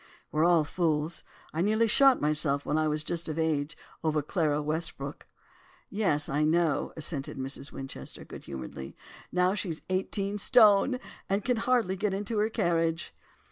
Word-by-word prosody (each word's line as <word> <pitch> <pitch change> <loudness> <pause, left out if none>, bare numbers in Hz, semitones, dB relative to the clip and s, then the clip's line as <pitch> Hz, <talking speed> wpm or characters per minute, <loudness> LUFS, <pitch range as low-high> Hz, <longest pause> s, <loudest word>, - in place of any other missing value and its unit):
We're 155 +2 +2
all 170 -2 +5
fools; 155 0 -1 0.3
I 160 - -1
nearly 215 +4 +3
shot 270 +4 +5
myself 150 -1 +2
when 150 - 0
I 155 0 +2
was 150 0 +1
just 170 +1 -2
of 155 - -4
age 155 -1 -1 0.3
over 155 -2 +1
Clara 150 -2 0
Westbrook.' 150 -2 -4 0.6
"'Yes, 180 -8 +1
I 145 +2 0
know,' 160 0 +1
assented 150 -2 -3
'Mrs. 135 +1 -5
Winchester,' 135 0 -8
good - - -10
humouredly; 65 0 -7 0.4
'now 180 +1 +2
she's 180 -6 -4
eighteen 195 +2 -1
stone 225 +2 +5 0.3
and 195 +1 0
can 250 -2 +1
hardly 230 -5 +1
get 195 0 -1
into 205 +2 -2
her 215 +1 +2
carriage. 165 -4 0
165 Hz, 155 wpm, -29 LUFS, 150-200 Hz, 0.6 s, all